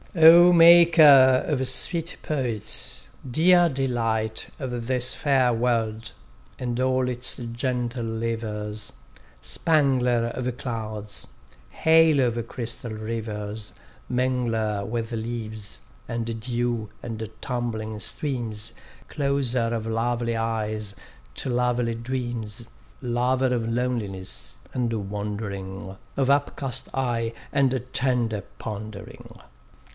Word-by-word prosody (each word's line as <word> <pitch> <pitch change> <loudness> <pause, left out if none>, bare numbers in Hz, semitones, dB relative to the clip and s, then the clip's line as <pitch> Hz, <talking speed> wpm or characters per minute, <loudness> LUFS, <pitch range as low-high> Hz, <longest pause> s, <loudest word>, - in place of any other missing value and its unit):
O 170 +2 +9
Maker 165 -6 +8
of 130 -4 0
sweet 170 -1 +1
poets, 115 - -1 0.2
dear 175 +6 +5
delight 115 -5 -1
Of 125 -3 -4
this 125 -1 +3
fair 135 -4 +2
world, 115 -2 -1 0.5
and 120 -1 -2
all 130 0 +2
its 125 0 +1
gentle 120 0 -3
livers; 110 -2 -3 0.5
Spangler 125 - +2
of 125 -1 -3
clouds, 110 -4 -5 0.4
halo 160 -4 +4
of 115 -1 -3
crystal 115 -1 -4
rivers, 110 -1 -5 0.4
Mingler 115 -5 0
with 115 +1 -3
leaves, 110 -2 -5 0.3
and 115 -1 -3
dew 120 -2 -2
and 110 -2 -5
tumbling 110 -4 -3
streams, 115 -4 -2 0.3
Closer 135 -5 +1
of 110 -1 -3
lovely 115 +1 -1
eyes 110 -2 -2 0.4
to - - -3
lovely 125 -1 +1
dreams, 120 -2 -4 0.4
Lover 125 +1 +1
of 115 -2 -1
loneliness, 95 - -3 0.2
and 120 -2 -1 0.2
wandering, 100 -2 -5 0.2
Of 135 -1 +2
upcast 140 -2 0
eye, 120 -3 -1 0.2
and 135 -2 +2
tender 120 -5 0 0.2
pondering! 105 -1 -8
120 Hz, 100 wpm, -25 LUFS, 110-130 Hz, 0.5 s, O